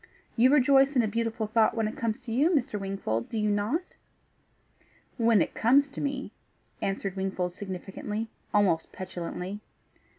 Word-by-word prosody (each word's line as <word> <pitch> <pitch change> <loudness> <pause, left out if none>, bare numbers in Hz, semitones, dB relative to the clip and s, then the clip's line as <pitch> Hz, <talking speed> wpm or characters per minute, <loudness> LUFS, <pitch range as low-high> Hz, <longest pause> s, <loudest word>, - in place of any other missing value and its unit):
You 255 +3 +5
rejoice 275 0 +5
in 245 - +4
a - - +1
beautiful 225 0 -1
thought 220 +1 +2
when 220 -1 +1
it 215 - -5
comes 230 +2 -3
to 230 - -5
you, 275 +8 +3
Mr. 265 - 0
Wingfold 195 - -3
do 225 - -4
you 210 -1 +1
not?" 210 - 0 1.3
"When 230 -6 +4
it - - -7
comes 275 +5 +4
to 280 - -7
me," 280 -1 -3 0.5
answered 195 -1 -2
Wingfold 190 -2 -2
significantly 200 +3 -5 0.2
almost 190 -6 +2
petulantly. 185 +1 -5
215 Hz, 155 wpm, -28 LUFS, 195-250 Hz, 1.3 s, You